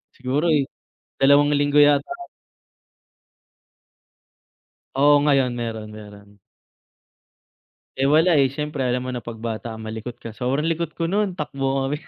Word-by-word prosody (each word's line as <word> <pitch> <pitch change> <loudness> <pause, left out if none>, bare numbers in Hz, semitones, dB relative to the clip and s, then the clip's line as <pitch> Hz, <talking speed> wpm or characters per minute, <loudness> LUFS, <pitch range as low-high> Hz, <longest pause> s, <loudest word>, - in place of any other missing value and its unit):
siguro, 135 +6 -1
eh, 150 -4 +3 0.5
dalawang 145 +2 +4
linggo 145 +1 +2
yata. 145 - +4 2.9
Oo, 145 +1 +5
ngayon 135 -4 +2
meron, 110 -2 -5
meron. 105 -1 -13 1.6
Eh, 135 +1 +1
wala, 160 +5 +4
eh, 135 - +3
syempre 150 +1 -5
alam 125 +1 -1
mo 130 - -4
na 125 - -4
'pag 115 0 -8
bata 115 0 -5
malikot 110 +2 -7
ka. 115 - -9
Sobrang 130 +6 -2
likot 165 -1 -2
ko 165 - -2
nun 195 +1 -1
takbuhan 135 -3 -2
kami, 150 - -2
135 Hz, 130 wpm, -22 LUFS, 120-150 Hz, 2.9 s, Oo